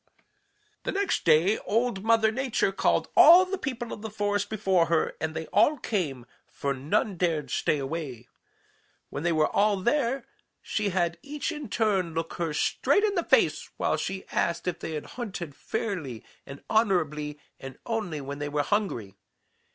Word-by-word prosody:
"The - - -3
next 395 0 -1
day 165 +6 +4
Old 225 -2 -1
Mother 220 -1 +4
Nature 250 -4 0
called 195 - +1
all 355 +3 +9
the 380 +1 -3
people 240 -7 -4
of - - -8
the 220 - -5
forest 205 -1 -1
before 190 -5 +2
her, 165 -1 +1
and 160 0 -2
they 160 - -3
all 260 +9 +4
came, 155 - -2 0.2
for 140 -1 -2
none 175 +9 -1
dared 165 -4 0
stay 150 - +1
away. 135 -4 -5 0.8
When 140 - -4
they 170 +2 +1
were 155 -1 +2
all 205 0 +3
there, 240 +5 0 0.3
she 210 -2 -2
had 175 -2 0
each 295 +2 -4
in 295 -6 -6
turn 195 -7 0
look 165 0 -3
her 165 -2 -1
straight 405 - +2
in 420 -2 +2
the 355 - +1
face - - +2
while - - +1
she 190 0 -4
asked 170 +1 -1
if 175 -1 -2
they 160 - -5
had 150 - -4 0.2
hunted 180 -9 -5
fairly 160 - -4 0.2
and 140 +1 -10
honorably 155 -9 +1 0.2
and 135 -1 -9
only 210 -10 -2
when 140 +1 -6
they 145 0 -3
were 145 0 0
hungry. 140 - -1
190 Hz, 170 wpm, -27 LUFS, 155-220 Hz, 0.8 s, all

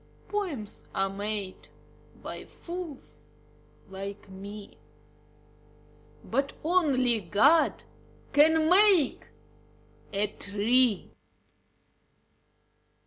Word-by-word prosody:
Poems 330 - -4
are 195 0 0
made 200 -1 -5 0.6
by - - -7
fools 305 - -9 0.6
like 195 +1 -8
me, 200 +2 -10 1.4
But 275 0 -1
only 275 -9 +2
God 245 - +3 0.5
can 315 +2 +5
make 370 -3 +4 0.8
a 200 +1 +1
tree. 210 +3 +1
240 Hz, 65 wpm, -28 LUFS, 200-315 Hz, 1.4 s, can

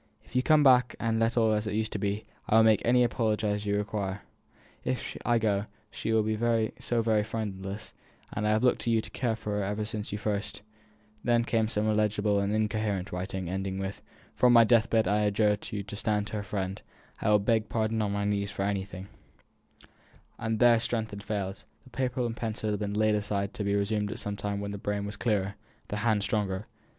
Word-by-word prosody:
If - - -21
you - - +5
will 125 - -2
come 155 -2 +5
back 125 -2 +5
and 115 -1 0
let 115 +1 +1
all 110 -2 +4
be 105 - +3
as 105 +1 -3
it 105 - -2
used 110 0 -1
to 105 - -3
be, 100 +2 -2 0.2
I - - +4
will 110 - +7
make 110 -2 +5
any 125 +1 +4
apology 110 -3 0
you 105 0 -1
may - - +2
require. 100 -2 -3 0.6
If 130 0 -3
I 120 -1 +3
go, 105 -2 0 0.2
she - - -3
will 110 -1 +3
be 110 +1 +1
so 120 -1 0
very 110 -2 +3
friendless; 105 -1 -5 0.4
and 105 0 -1
I - - +2
have 110 +2 +2
looked 125 - +3
to - - -1
you 115 -1 +3
to - - -6
care 120 -3 -1
for 105 -2 -3
her - - 0
ever 105 +2 -2
since 105 -1 -5
you 105 - -2
first 105 -1 -3 0.3
" 105 0 -33
Then 120 -1 +3
came 115 -2 +1
some 105 -1 -1
illegible 105 -1 +2
and 100 +1 0
incoherent 105 -2 -1
writing, 90 0 -4
ending 95 +1 -3
with, 95 +1 -4 0.3
"From 125 -1 +4
my 115 -1 +9
deathbed 115 -1 +3
I 105 - +2
adjure 105 0 +3
you 105 -1 -3
to 100 +1 -8
stand 105 0 0
her 105 - -3
friend; 95 0 -3 0.4
I - - +1
will 105 - +6
beg 110 +1 +1
pardon 110 0 0
on 105 -2 0
my 100 0 -1
knees 100 -1 0
for 100 -1 -3
anything 95 -1 -3 0.7
" - - -28
And 110 -1 -1
there 120 0 +6
strength 110 -1 -2
had 100 0 -7
failed; 100 -2 -4 0.2
the 130 - -18
paper 125 0 -1
and 115 -1 -3
pencil 110 -1 -2
had 105 - -1
been 105 -1 -2
laid 110 0 +3
aside 100 -1 -1
to 105 - -4
be 100 0 +1
resumed 105 +1 0
at 115 - -5
some 105 -3 -4
time 100 0 -3
when 100 0 -4
the 100 - -5
brain 100 0 -2
was 100 0 -5
clearer, 105 -2 -1 0.3
the 105 - -2
hand 105 -1 +1
stronger. 105 -3 -1
105 Hz, 225 wpm, -29 LUFS, 100-110 Hz, 0.7 s, my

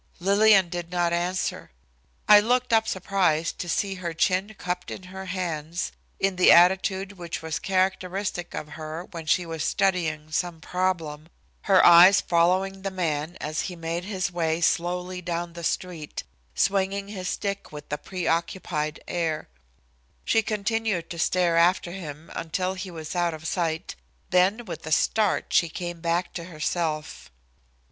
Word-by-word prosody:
Lillian 200 0 +5
did 175 -1 -5
not 175 -1 0
answer. 175 +2 -2 0.6
I 210 0 +9
looked 245 +3 +1
up 220 0 +4
surprised 185 -5 0
to 175 - -4
see 195 +3 0
her 170 -2 -4
chin 190 +5 +1
cupped 180 0 -4
in - - -7
her 190 0 -7
hands, 175 -2 -3 0.3
in 195 -1 0
the 180 - +7
attitude 190 +2 +4
which 170 -1 -5
was 160 -1 -3
characteristic 190 -2 -1
of 150 - -5
her 155 +2 -6
when 165 -3 -7
she 175 +3 +2
was 165 -2 -4
studying 165 -6 0
some 170 +1 -2
problem, 165 -3 -2 0.4
her 190 -1 +6
eyes 175 +3 +9
following 185 +3 +1
the 195 - -2
man 165 -3 -2
as 155 +1 -2
he 180 - -7
made 165 +1 -3
his 190 -3 -2
way 165 -2 0
slowly 180 +2 0
down 170 -1 -3
the 170 0 -8
street, 165 -3 -3 0.3
swinging 195 +1 +1
his 185 -3 -4
stick 200 -1 -3
with 150 -1 -8
a - - 0
pre 185 +1 -5
occupied 165 -2 -1
air. 160 - -2 0.8
She 225 - +3
continued 215 -4 -1
to 170 - -6
stare 175 0 +2
after 175 +1 +3
him 160 -4 -8
until 185 +3 -2
he 185 0 -6
was 160 -1 -7
out 175 -2 +1
of 155 0 -12
sight, 165 0 -2 0.4
then 190 +6 +3
with 170 -5 -7
a - - -4
start, 210 +6 +1
she 170 - +4
came 175 +1 -5
back 170 +1 -1
to 170 - -5
herself. 155 -2 -3
175 Hz, 155 wpm, -25 LUFS, 165-190 Hz, 0.8 s, I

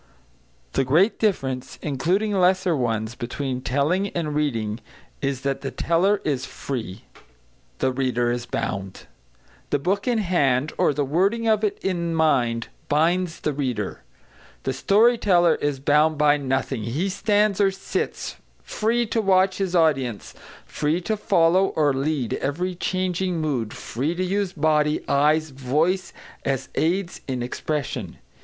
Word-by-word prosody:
The - - +2
great 165 - +3
difference, 135 - -1
including 180 - 0
lesser 185 -2 +3
ones, 115 -4 -1
between 125 +2 -4
telling 150 +10 +1
and 165 -6 -3
reading 115 -8 -1 0.4
is 135 -2 -1
that 140 0 -2
the 135 - -3
teller 185 +8 +1
is 135 -4 0
free; 115 -7 -6 0.7
the 130 - +1
reader 125 -2 0
is 120 0 -3
bound. 95 -4 -4 0.6
The - - +2
book 195 - -1
in 245 -2 +2
hand, 150 -9 +1
or - - +4
the 145 0 -1
wording 195 +11 +1
of 215 -1 +3
it 210 - 0
in 170 -3 -1
mind, 125 -8 +1 0.2
binds 170 +3 +1
the 150 - -1
reader. 125 -8 -3 0.6
The 135 - -1
story 220 - +4
teller 175 -4 +4
is 145 -2 -2
bound 150 +3 +3
by 150 0 +4
nothing; 135 -3 -1
he 130 - -1
stands 205 +1 +1
or 195 - +5
sits, 195 0 -4 0.3
free 235 +2 0
to 225 0 0
watch 190 -1 +3
his 190 -2 -1
audience, 135 - +1 0.3
free 155 +3 -1
to 220 +5 -1
follow 180 -2 +3
or 145 -3 +3
lead 135 -3 -1
every 175 +7 -2
changing 185 0 -1
mood, 130 -8 -1
free 145 +8 -3
to 185 - -1
use 195 0 -1
body, 150 -2 +1
eyes, 150 +2 +2
voice, 155 +8 0 0.3
as 135 -1 -2
aids 175 +3 -1
in 130 -3 -2
expression. 145 +3 -4
155 Hz, 145 wpm, -23 LUFS, 135-185 Hz, 0.7 s, or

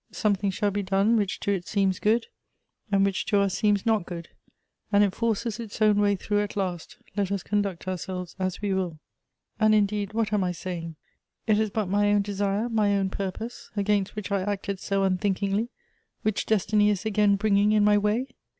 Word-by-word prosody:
Something 200 -1 0
shall 205 +1 0
be 205 +1 -1
done 195 +4 +2
which 205 -4 0
to 200 - 0
it 185 -3 -2
seems 195 -2 +1
good, 225 +2 +2 0.7
and 195 -1 +4
which 195 -1 0
to 205 - +3
us 200 -2 +1
seems 205 -2 +1
not 220 -4 +2
good; 170 -2 -7 0.6
and 205 0 +5
it 200 -2 +1
forces 230 -1 -1
its 225 -3 -7
own 210 -1 +4
way 205 0 +3
through 205 +2 0
at 205 - -4
last, 180 -4 -3 0.2
let 200 -2 -1
us 200 -3 -1
conduct 200 -3 -2
ourselves 180 -1 -4
as 185 +2 -2
we 200 -2 +1
will. 180 -4 -2 0.6
"And, 215 -1 +5
indeed, 205 0 0
what 220 -1 0
am 205 -2 +2
I 180 -1 -1
saying? 170 -2 -6 0.5
It 215 -2 +3
is 220 -1 +1
but 215 0 -1
my 205 +2 +2
own 205 -1 +3
desire, 200 +2 -1
my 210 -3 +2
own 190 -1 -1
purpose, 200 +5 -5
against 200 -1 +1
which 210 -1 -5
I 200 -1 +1
acted 200 0 -3
so 195 0 0
unthink 190 0 +1
ingly, 200 +4 -1 0.5
which 215 -1 -1
destiny 210 0 +3
is 205 0 -1
again 210 -1 +3
bringing 205 0 +3
in 215 -1 +4
my 210 0 +5
way? 210 +5 +1
200 Hz, 200 wpm, -26 LUFS, 195-210 Hz, 0.7 s, and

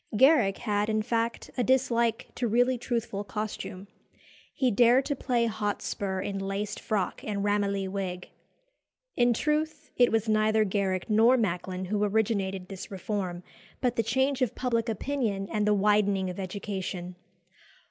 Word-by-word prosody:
Garrick 260 -7 +5
had, 210 -1 -1
in 215 0 +1
fact, 230 0 -2
a - - +3
dislike 235 -3 +1
to 245 - -1
really 245 +3 +3
truthful 230 -4 -3
costume. 205 -2 -5 0.6
He 255 -2 +1
dared 240 +5 +5
to 285 - -1
play 245 -3 +1
Hotspur 205 -3 -2
in 195 0 -3
laced 195 +1 -3
frock 205 -5 -2
and 200 -2 -2
Ramillies 200 -1 0
wig. 185 -2 -4 0.9
In 240 0 +4
truth, 300 +4 -1
it 245 -1 +5
was 225 0 +1
neither 215 0 +3
Garrick 190 -2 -1
nor 230 +4 +5
Macklin 185 -3 -2
who 210 +2 0
originated 200 -3 0
this 195 -1 -8
reform, 185 -2 -4 0.4
but 245 -2 0
the - - +2
change 265 +5 0
of 255 - +1
public 235 -2 0
opinion 220 -4 -2
and 210 -1 0
the 210 - +4
widening 200 -2 +2
of 180 - -8
education. 190 -2 -4
210 Hz, 145 wpm, -28 LUFS, 195-235 Hz, 0.9 s, Garrick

